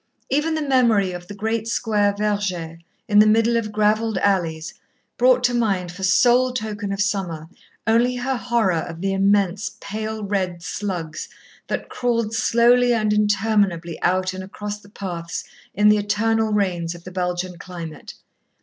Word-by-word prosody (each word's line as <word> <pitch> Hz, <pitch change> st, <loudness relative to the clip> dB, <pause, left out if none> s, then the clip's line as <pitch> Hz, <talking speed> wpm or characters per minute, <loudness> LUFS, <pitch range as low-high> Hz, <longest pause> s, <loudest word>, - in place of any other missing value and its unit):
Even 305 Hz, +4 st, +1 dB
the 310 Hz, -, -1 dB
memory 235 Hz, -8 st, +3 dB
of 175 Hz, 0 st, -8 dB
the 205 Hz, -, -8 dB
great 220 Hz, +2 st, -2 dB
square 210 Hz, -3 st, +1 dB
verger, 195 Hz, -6 st, -2 dB, 0.3 s
in 210 Hz, -1 st, +5 dB
the 210 Hz, -, +7 dB
middle 225 Hz, +2 st, +3 dB
of 220 Hz, -2 st, -1 dB
gravelled 215 Hz, 0 st, +1 dB
alleys, 170 Hz, -5 st, 0 dB, 0.4 s
brought 250 Hz, 0 st, +4 dB
to 245 Hz, 0 st, +3 dB
her 240 Hz, -, +1 dB
mind 190 Hz, -6 st, 0 dB
for 180 Hz, +2 st, -11 dB
sole 245 Hz, +7 st, +4 dB
token 215 Hz, -4 st, -4 dB
of 195 Hz, -, -3 dB
summer, 190 Hz, -6 st, -2 dB, 0.4 s
only 235 Hz, +3 st, +3 dB
her 255 Hz, +2 st, -1 dB
horror 235 Hz, -8 st, +1 dB
of 165 Hz, 0 st, -7 dB
the 195 Hz, 0 st, 0 dB
immense 195 Hz, 0 st, +1 dB
pale 215 Hz, +1 st, -5 dB
red 185 Hz, -4 st, -2 dB
slugs 165 Hz, -2 st, -4 dB, 0.4 s
that -, -, -3 dB
crawled 230 Hz, -3 st, -1 dB
slowly 240 Hz, +2 st, +4 dB
and 215 Hz, -2 st, +1 dB
interminably 205 Hz, -5 st, +1 dB
out 185 Hz, 0 st, +1 dB
and 190 Hz, 0 st, -6 dB
across 205 Hz, +2 st, -6 dB
the 205 Hz, -1 st, -18 dB
paths 170 Hz, -5 st, -5 dB, 0.3 s
in 210 Hz, +2 st, +4 dB
the 210 Hz, 0 st, +6 dB
eternal 220 Hz, +2 st, +1 dB
rains 175 Hz, -5 st, 0 dB
of 170 Hz, -, -13 dB
the 185 Hz, -, -9 dB
Belgian 180 Hz, -1 st, -3 dB
climate. 170 Hz, -4 st, -8 dB
205 Hz, 160 wpm, -22 LUFS, 185-225 Hz, 0.4 s, the